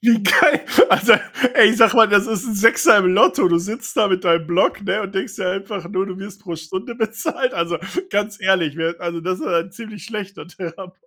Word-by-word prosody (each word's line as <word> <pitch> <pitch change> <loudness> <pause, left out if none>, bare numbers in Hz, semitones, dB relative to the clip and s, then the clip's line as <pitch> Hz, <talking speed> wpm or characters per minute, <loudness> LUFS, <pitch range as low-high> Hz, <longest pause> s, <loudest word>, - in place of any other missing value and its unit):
Wie 230 -3 +3
geil, 280 +9 +4 0.3
also - - +4 0.4
ey, 210 - +7
ich 230 - -2
sage 230 +1 +4
mal: 225 -1 +6
„Das 205 -1 +3
ist 220 -2 -4
'n 220 - -4
6er 210 0 +4
im 190 - +2
Lotto.“ 185 -2 +3
Du 170 - +2
sitzt 215 +11 -7
da 215 -3 +2
mit 185 0 -2
deinem 165 -2 +1
Block, 175 +3 0
ne, 200 +2 -2
und 195 -1 -8
denkst 190 +2 -5
dir 185 -3 -3
einfach 195 -1 -6
nur: 195 0 -3
„Du 185 -1 -8
wirst 200 +1 -11
pro 170 -4 -7
Stunde 190 +8 -8
bezahlt.” 225 +3 -3
Also 170 -1 -3 0.3
ganz 205 +1 -3
ehrlich, 180 -6 0
wer 165 +1 -4
also, 170 -1 -5
das 185 +2 -4
ist - - -7
aber 170 - 0
'n 170 +3 -5
ziemlich 215 -2 -11
schlechter 205 -3 -8
Therapeut. 180 +1 -10
195 Hz, 230 wpm, -19 LUFS, 180-215 Hz, 0.4 s, ey